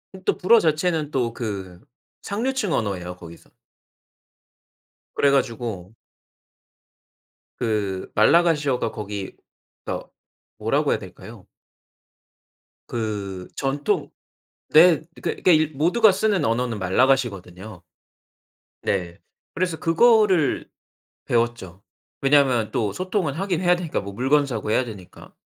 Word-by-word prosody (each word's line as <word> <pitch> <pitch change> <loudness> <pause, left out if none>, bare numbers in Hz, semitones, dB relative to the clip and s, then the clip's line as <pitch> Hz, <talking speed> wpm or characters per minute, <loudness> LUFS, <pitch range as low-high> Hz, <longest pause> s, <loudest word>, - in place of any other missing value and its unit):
음 190 - -11
또 - - +1
불어 225 +5 +5
자체는 155 -2 0
또 120 -3 -1
그 95 -7 -6 0.4
상류층 225 - -2
언어예요 90 -5 -2
거기서. 85 -1 -13 1.7
그래 140 -1 +3
가지고 115 -7 -2 1.7
그 105 -5 -2
말라가시어가 145 -2 +3
거기 105 -2 -6 0.5
더 - - -5 0.5
뭐라고 - - 0
해야 - - +1
될까요? - - -12 1.4
그 100 -5 -4
전통 140 +1 -1 0.6
네 160 0 +7 0.2
그 - - -2
그러니까 155 -4 +3
모두가 200 +7 +4
쓰는 195 -3 +1
언어는 115 -1 -1
말라가시거든요. 100 -3 0 1.0
네. 90 -3 -2 0.3
그래서 175 -2 -1
그거를 190 - +3 0.6
배웠죠. 115 -6 -2 0.4
왜냐하면 135 -5 +3
또 105 -4 -1
소통은 185 -6 -2
하긴 185 -1 -2
해야 180 -1 +4
되니까 170 -3 -3
뭐 100 0 -8
물건 140 +6 +2
사고해야 115 0 -1
되니까. 100 -6 -12
130 Hz, 240 characters per minute, -23 LUFS, 105-165 Hz, 1.7 s, 네